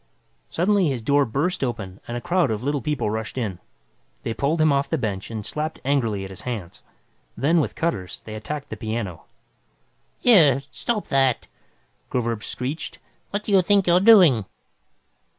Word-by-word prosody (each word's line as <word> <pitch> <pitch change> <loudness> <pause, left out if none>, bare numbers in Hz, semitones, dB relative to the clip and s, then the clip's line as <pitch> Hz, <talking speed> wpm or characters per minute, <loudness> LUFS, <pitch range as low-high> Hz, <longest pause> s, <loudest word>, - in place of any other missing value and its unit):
Suddenly 190 +1 +2
his 130 -5 -2
door 140 +3 +3
burst 140 +9 -1
open 105 -7 -4
and 120 - -3
a - - -5
crowd 175 -2 +1
of 110 +1 -2
Little 145 0 0
People 145 -6 -1
rushed 110 +3 -4
in. 105 -8 -3 0.6
They 115 - -2
pulled 145 +7 0
him 155 -1 +4
off 140 0 0
the 160 - 0
bench 100 -7 -3
and 110 -2 -5
slapped 155 +1 -3
angrily 115 -8 +1
at 95 - -7
his 95 - -8
hands. 110 -9 -6 0.6
Then, 150 +8 +3
with - - -3
cutters, 100 - -2
they 110 - -7
attacked 140 +7 -5
the 110 - -6
piano. 110 -5 -4 0.9
"Here, 160 - +5
stop 230 -4 -3
that!" 135 -3 +2 0.6
Groverzb 115 -3 -1
screeched. 130 +8 -5 0.3
"What 205 +1 -3
do 210 - -4
you 195 -2 +6
think 200 +1 +3
you're 175 +1 +5
doing?" 180 - +6
135 Hz, 170 wpm, -23 LUFS, 110-165 Hz, 0.9 s, you